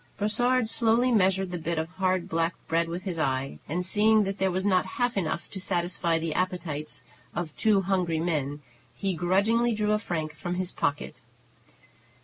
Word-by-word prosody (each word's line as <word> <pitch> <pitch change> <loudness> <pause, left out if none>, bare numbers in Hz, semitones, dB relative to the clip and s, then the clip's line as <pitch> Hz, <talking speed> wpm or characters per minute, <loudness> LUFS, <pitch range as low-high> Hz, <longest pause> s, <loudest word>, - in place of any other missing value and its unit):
Brossard 245 +3 +2
slowly 230 +2 +3
measured 190 -3 +2
the 175 - -3
bit 165 +1 -2
of 160 0 -1
hard, 185 -1 0
black 165 +1 0
bread 165 +1 +1
with 175 +2 -4
his 180 -4 -4
eye, 135 -2 -1
and, 180 +4 -1
seeing 215 +3 +4
that 195 0 -3
there 190 0 +2
was 185 +1 -1
not 185 -2 +3
half 245 -1 +1
enough 170 -3 -2
to 190 - -6
satisfy 175 -2 0
the 165 -1 -2
appetites 175 -5 -3 0.3
of 165 -2 -4
two 210 -3 +3
hungry 180 -4 0
men, 145 -4 -2 0.3
he 195 -1 -1
grudgingly 200 +8 +2
drew 210 -1 0
a 210 - +2
franc 160 -6 -3
from 175 +3 -4
his 185 0 -2
pocket. 145 - -2
185 Hz, 175 wpm, -27 LUFS, 165-205 Hz, 0.3 s, seeing